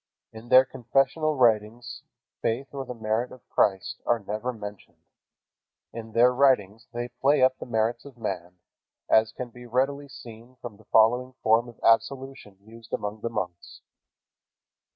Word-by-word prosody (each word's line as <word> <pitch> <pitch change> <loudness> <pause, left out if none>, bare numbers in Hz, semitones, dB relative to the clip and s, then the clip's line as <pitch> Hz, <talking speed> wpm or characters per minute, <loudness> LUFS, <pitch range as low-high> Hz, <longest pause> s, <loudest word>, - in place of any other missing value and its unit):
In 110 +2 -11
their 130 +1 +7
confessional 135 +5 0
writings 115 -1 +1 0.4
faith 120 +5 -1
or 135 -1 -5
the 125 - -7
merit 110 +2 -1
of 130 - -15
Christ 105 +2 0
are 120 - +2
never 110 +4 -4
mentioned. 105 -4 -10 1.0
In 115 -1 -8
their 125 +2 +5
writings 115 -5 +2
they 120 0 -4
play 135 +3 +2
up 130 0 +3
the - - -7
merits 115 0 0
of 140 -3 -13
man, 90 -5 -5 0.5
as 110 0 +5
can 125 0 -7
readily 130 +4 -1
be - - -18
seen 120 -2 -12
from 120 -4 -10
the 110 - -21
following 125 +5 +3
form 115 +2 +3
of 115 - -16
absolution 130 -3 0
used 115 0 -15
among 105 +1 -3
the 115 - -2
monks. 90 -6 -6
120 Hz, 150 wpm, -26 LUFS, 110-130 Hz, 1.0 s, their